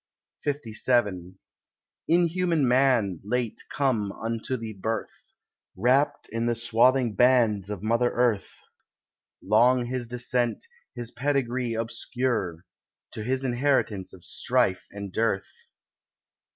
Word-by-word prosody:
LVII 110 -9 0 0.7
Inhuman 170 -3 +2
Man, 120 -8 +3
late 120 +2 -2
come 115 -8 0
unto 115 +4 -3
the 115 -2 -6
birth, 110 +3 -5 0.4
Wrapped 130 +8 +2
in 115 +1 -1
the 120 - +1
swathing 120 +1 +3
bands 115 -5 +3
of 105 -2 -5
mother 115 +2 +2
Earth, 120 -5 0 0.9
Long 120 +4 +4
his 125 -1 -3
descent, 125 - -1 0.3
his 120 -1 -5
pedigree 130 -3 -1
obscure, 115 -6 -2 0.5
To - - -6
his 130 +3 -1
inheritance 120 -6 0
of 90 - -11
strife 95 0 0
and 100 -2 -8
dearth. 110 -3 -2
120 Hz, 105 wpm, -26 LUFS, 105-130 Hz, 0.9 s, Long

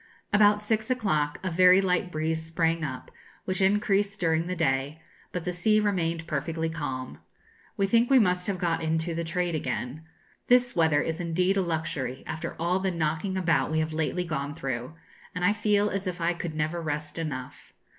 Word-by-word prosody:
About 210 0 +5
six 220 +1 0
o'clock 155 -13 0
a 185 - -1
very 180 +2 +6
light 180 -1 0
breeze 160 +1 -1
sprang 165 0 0
up, 130 -4 -5 0.3
which 185 +1 -1
increased 200 +1 +2
during 165 -1 +1
the 185 - -2
day; 140 -1 0 0.3
but 180 -2 -4
the 180 - -1
sea 215 +5 +3
remained 170 -6 0
perfectly 160 +1 -2
calm. 135 -6 -5 0.6
We 195 - +2
think 230 +4 +3
we 270 - +6
must 180 -5 +2
have 200 -2 -1
got 170 -2 0
into 160 +1 0
the 170 +1 -2
trade 175 +1 -1
again. 130 0 -3 0.4
This 245 0 +4
weather 160 -3 +3
is 165 +2 -3
indeed 180 +3 +1
a 195 - +2
luxury 160 -6 -3
after 160 - -5
all 175 +3 +1
the 190 0 0
knocking 165 +3 -1
about 165 -7 +2
we 160 - -1
have 155 0 0
lately 160 +3 -1
gone 145 -3 -3
through; 130 0 -4 0.4
and 180 0 0
I 205 - +4
feel 210 -1 +2
as 195 0 -3
if 180 0 -3
I 170 +1 +1
could 170 -2 -5
never 155 +3 -1
rest 150 0 -4
enough. 135 -6 -6
165 Hz, 185 wpm, -27 LUFS, 155-190 Hz, 0.6 s, very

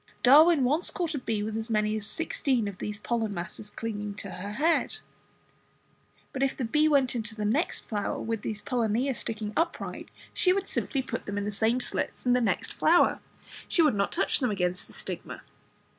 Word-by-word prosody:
Darwin 300 +3 +7
once 295 +7 +2
caught 340 -3 -2
a 285 - -2
bee 220 -4 -2
with 215 +1 -3
as 225 +1 -2
many 215 -1 +1
as 215 -1 -3
sixteen 265 -8 0
of 200 -2 -7
these 210 0 -4
pollen 220 -1 -2
masses 180 +4 -6
clinging 210 -2 -5
to 200 -1 -7
her 195 +3 -6
head. 320 +8 +1 1.4
But 265 - -3
if 275 -1 +1
the 255 - -1
bee 300 +7 +3
went 275 -5 +3
into 220 -2 -3
the 210 -1 -3
next 270 - 0
flower 205 -2 -3
with 225 -1 -3
these 215 -1 -4
pollinia 245 +2 0
sticking 215 -3 -4
upright, 335 +1 -2 0.2
she 365 - +4
would 395 0 -1
simply 270 -3 -1
put - - -5
them 205 0 -3
into 205 0 -1
the - - -5
same 230 +4 +2
slits 250 - -3
in 245 - +4
the 250 - +3
next 230 - 0
flower, - - +4 0.5
she 335 - +3
would 300 -5 +4
not 200 -1 0
touch - - +1
them 255 -3 +1
against 180 -3 -1
the - - -13
stigma. - - -6
225 Hz, 200 wpm, -28 LUFS, 210-275 Hz, 1.4 s, Darwin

